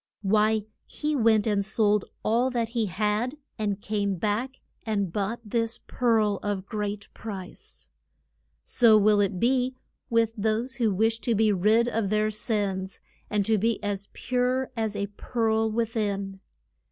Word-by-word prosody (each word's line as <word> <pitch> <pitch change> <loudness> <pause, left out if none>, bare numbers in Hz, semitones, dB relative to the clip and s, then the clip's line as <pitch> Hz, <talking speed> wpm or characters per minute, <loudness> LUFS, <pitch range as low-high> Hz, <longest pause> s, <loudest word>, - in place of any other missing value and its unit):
Why, 215 +1 +2 0.2
he 300 0 -2
went 220 -4 +4
and 205 -2 +1
sold 210 -1 +2 0.2
all 235 +4 +2
that 235 -3 -1
he 230 -2 0
had, 210 - 0 0.2
and 205 -2 -1
came 200 -2 -1
back 215 +8 -2 0.3
and 200 -6 -1
bought 210 +3 -2
this 230 +2 -1
pearl 220 -5 +1
of 200 -2 -2
great 205 -1 -4
price. 180 - -8 0.7
So 225 -3 +5
will 210 0 +4
it 195 -2 0
be 255 +2 +2 0.3
with 230 -1 +2
those 225 +4 -1
who 230 -4 +2
wish 225 +4 +1
to 235 -1 0
be 215 0 +3
rid 215 +5 +3
of 225 -4 -1
their 215 +1 +1
sins, 200 -3 -2 0.3
and 205 -2 +1
to 220 0 +2
be 225 +2 +1
as 200 -1 -2
pure 255 +1 0
as 220 -2 -2
a 200 0 -1
pearl 225 -2 +1
with 230 +1 -1
in. 200 -3 -2
215 Hz, 155 wpm, -26 LUFS, 205-230 Hz, 0.7 s, So